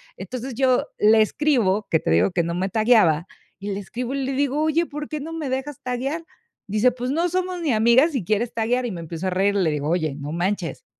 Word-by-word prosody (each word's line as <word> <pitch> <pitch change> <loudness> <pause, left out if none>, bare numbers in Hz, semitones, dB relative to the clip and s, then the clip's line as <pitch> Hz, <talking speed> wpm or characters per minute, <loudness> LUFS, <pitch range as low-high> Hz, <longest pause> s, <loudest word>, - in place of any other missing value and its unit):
Entonces, 255 +1 -6
yo 255 0 +2
le 220 +1 +5
escribo, 215 -7 +1
que 160 - +3
te - - -2
digo 85 +4 +3
que 170 - +1
no 170 +1 -3
me 185 +2 -1
tagueaba, 215 -7 +3 0.3
y 200 +1 -5
le 195 - -3
escribo 240 +6 -5
y 275 -1 -2
le 270 - -2
digo: 280 +2 0
"Oye, 315 +2 +2
¿por 300 -1 -7
qué 305 - -4
no 320 +3 -6
me 315 -4 -4
dejas 265 +2 -4
taguear?". 265 +6 -3 0.4
Dice: 215 +5 +3
"Pues 250 +1 -4
no 330 +5 +1
somos 365 0 -2
ni 295 -7 +1
amigas, 235 +8 +4
y 235 - -1
quieres 215 +5 -1
taguear". 240 +3 0
Y 240 - -3
me 175 -3 -6
empiezo 165 +2 -5
a - - +1
reír, 195 +2 +1
le 180 -6 +2
digo: 150 0 -2
"Oye, 160 -4 0
no 145 +1 -6
manches, 175 +1 -2
235 Hz, 235 wpm, -23 LUFS, 190-275 Hz, 0.4 s, le